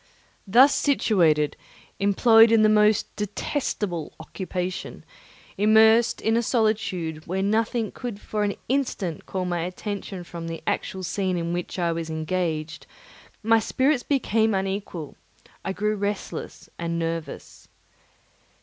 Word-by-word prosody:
Thus 255 +8 +6
situated, 170 - +2 0.4
employed 225 +3 +5
in 225 -1 +5
the 215 - +5
most 210 0 +3
detestable 205 - -3
occupation, 180 +2 -5 0.5
immersed 220 +2 +5
in 225 +1 +1
a 235 - +3
solitude 195 -9 -1
where 190 +3 -1
nothing 220 +1 0
could 240 -5 -6
for 210 0 -4
an 200 -1 -1
instant 240 - -2
call 185 -1 -3
my 175 -1 -1
attention 185 +1 -5
from 170 -1 -8
the 165 -1 -6
actual 190 0 -2
scene 185 0 -1
in 170 0 -2
which 175 +2 -4
I 170 -2 +1
was 165 -1 -4
engaged, 160 -2 -3 0.6
my 225 +1 +4
spirits 260 +4 +1
became 225 -6 +1
unequal; 190 -5 -4 0.5
I 190 - -2
grew 210 +2 -1
restless 205 0 -4
and 170 0 -2
nervous. 165 -3 -5
195 Hz, 125 wpm, -24 LUFS, 170-220 Hz, 0.6 s, Thus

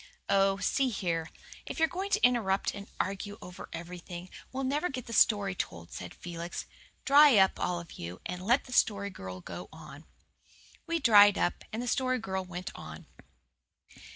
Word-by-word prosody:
"Oh, 195 0 +3
see 260 +7 +1
here, 170 -7 -2 0.4
if - - -5
you're 320 -1 +4
going 380 +4 -4
to - - +4
interrupt 215 -6 +2
and 200 0 -8
argue 200 +2 -3
over 180 0 -10
everything, 175 +1 -8 0.2
we'll 270 +1 -3
never 290 +7 0
get 255 -3 -5
the 230 - -7
story 205 -4 +4
told," 85 - -5
said 90 -1 -7
Felix. 170 0 -6 0.4
"Dry 285 -3 +7
up, 190 -1 +4
all 175 -1 -1
of 170 -1 -11
you, 85 +2 -6
and 180 0 -4
let 240 +7 +3
the 250 - -10
Story 200 -4 +2
Girl 95 - -8
go 175 - -8
on." 155 -1 -12 0.8
We 335 0 +1
dried 205 -6 +7
up, 175 - 0
and 225 +3 -3
the - - -5
Story 255 0 +1
Girl 190 -5 -3
went 180 0 -6
on. - - -10
195 Hz, 175 wpm, -30 LUFS, 175-245 Hz, 0.8 s, Dry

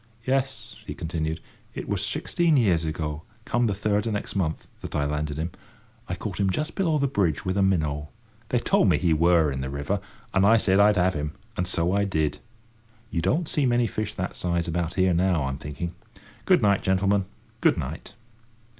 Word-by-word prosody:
"Yes," 130 -3 -1
he - - -5
continued, 80 -1 -3 0.3
"it - - -5
wur - - 0
sixteen 170 -4 +1
year 110 -8 +4
ago, 80 -2 -2 0.2
come 120 0 +1
the 100 - 0
third 105 +1 0
o' - - +1
next 105 -2 -3
month, 85 -5 -1
that - - -6
I 75 - +1
landed 75 0 -2
him. 80 +3 -2 0.6
I - - -1
caught - - -5
him 100 -1 +2
just 150 - -1
below 165 -5 +1
the 140 - +1
bridge 95 - 0
with 95 0 0
a 100 - +2
minnow. 75 -6 +1 0.4
They - - +2
told - - +3
me - - +4
he 85 -3 +2
wur 80 -1 +4
in 65 0 -3
the 65 - -3
river, 70 +9 -2 0.3
and 95 - +3
I 110 +3 +6
said 95 -3 +3
I'd 105 0 +5
have 90 +1 +3
him, 75 -1 -3 0.2
and 90 - -1
so 85 -1 0
I 100 +1 +2
did. 80 -6 0 0.7
You 85 - 0
don't 155 - +1
see 145 -4 +1
many 120 0 +3
fish 105 -1 -3
that 95 -1 -3
size 85 -1 -1
about 85 0 -2
here 95 -1 +3
now, 85 -2 +2
I'm 65 +1 -3
thinking. 75 +4 -5 0.5
Good - - +4
night, 100 -1 +4
gentlemen, 95 +1 +2 0.3
good - - +3
night." 75 +7 -6
90 Hz, 200 wpm, -26 LUFS, 80-105 Hz, 0.7 s, I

